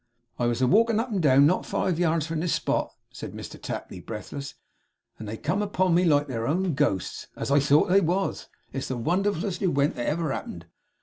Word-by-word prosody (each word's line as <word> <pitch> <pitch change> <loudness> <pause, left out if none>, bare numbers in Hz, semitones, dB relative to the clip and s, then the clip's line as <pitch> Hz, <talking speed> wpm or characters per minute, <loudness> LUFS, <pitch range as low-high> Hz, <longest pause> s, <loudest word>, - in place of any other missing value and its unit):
'I 120 - +2
was 120 +1 -1
a - - +4
walkin' 225 - +4
up 235 +2 -2
and 195 -4 0
down 140 -2 +6
not 180 +5 +2
five 175 -3 -1
yards 165 -3 +1
from 165 -1 -3
this 170 +1 0
spot,' - - -1 0.2
said - - -8
Mr - - -9
Tapley, - - -6
breathless, 115 +8 -7 0.6
'and 110 - -7
they 110 +2 -5
come 180 - -1
upon 185 -3 +1
me 180 +2 +4
like 145 -3 +3
their 115 -4 -3
own 180 +3 0
ghosts, 130 -10 -1
as - - -4
I 145 - +5
thought 145 +2 +4
they 195 +2 +5
was! 185 +3 -1 0.3
It's 135 - -3
the 130 - -3
wonderfulest 185 - -1
ewent 145 -7 +2
that 120 - -4
ever 155 -1 0
happened. 85 -8 -6
155 Hz, 205 wpm, -26 LUFS, 135-185 Hz, 0.6 s, down